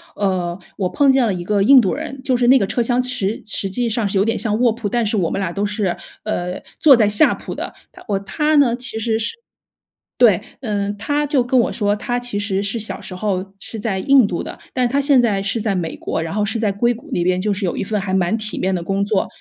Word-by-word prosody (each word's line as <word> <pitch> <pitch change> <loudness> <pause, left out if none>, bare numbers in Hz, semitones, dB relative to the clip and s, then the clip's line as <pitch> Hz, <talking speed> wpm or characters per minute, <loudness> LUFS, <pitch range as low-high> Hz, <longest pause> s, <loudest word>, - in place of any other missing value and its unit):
呃， 185 -3 -1 0.2
我 185 -3 -1
碰 280 +5 +3
见 265 -2 +3
了 205 - 0
一 175 -1 -4
个 205 +2 +1
印 265 +7 +7
度 195 -7 +1
人， 285 -2 -6
就 265 -3 +1
是 240 0 +2
那 265 +2 +7
个 210 - +1
车 240 - -1
厢 245 +1 +1
实 245 -5 -2
实 205 -2 -2
际 240 +5 -1
上 225 -1 0
是 195 - -1
有 195 - +3
点 225 - 0
像 215 -1 +1
卧 245 -1 +4
铺， 225 -1 -4
但 235 +2 0
是 215 - 0
我 175 -4 +1
们 - - -2
俩 190 -4 -2
都 200 +3 -3
是， 205 -3 -1 0.3
呃， 180 -4 -3 0.2
坐 285 -4 +7
在 220 -3 +3
下 210 +9 +5
铺 - - -7
的。 - - -5 0.2
他 - - -15
我 200 -2 0
他 300 +10 0
呢， 270 -5 +4
其 245 -2 -6
实 225 0 0
是 225 - -2 0.9
对， - - +5 0.2
嗯， 205 -4 -2
他 290 +7 -1
就 280 -3 +2
跟 245 +1 +1
我 - - 0
说， 205 -2 0
他 245 +3 -2
其 245 -4 -3
实 200 -1 -1
是 205 +3 -1
小 220 - -4
时 185 - -7
候 195 0 -3
是 220 - -8
在 205 -3 -2
印 270 +3 +5
度 175 -4 -3
的， - - -8 0.2
但 255 - +1
是 240 - -3
他 280 - +2
现 280 -2 +4
在 205 -5 +1
是 200 +4 -1
在 210 -2 -1
美 170 -3 -3
国。 - - -3
然 165 +2 -4
后 210 0 +1
是 220 +3 -2
在 215 -2 +1
硅 235 +5 +1
谷 245 +7 -11
那 175 - 0
边 180 0 +1
就 210 +2 0
是 200 +1 -4
有 180 - -1
一 - - -2
份 210 +2 -1
还 195 -1 -3
蛮 190 +2 +1
体 215 -1 -4
面 190 0 0
的 175 - -2
工 195 +3 -1
作。 205 -1 0
210 Hz, 290 characters per minute, -19 LUFS, 195-245 Hz, 0.9 s, 印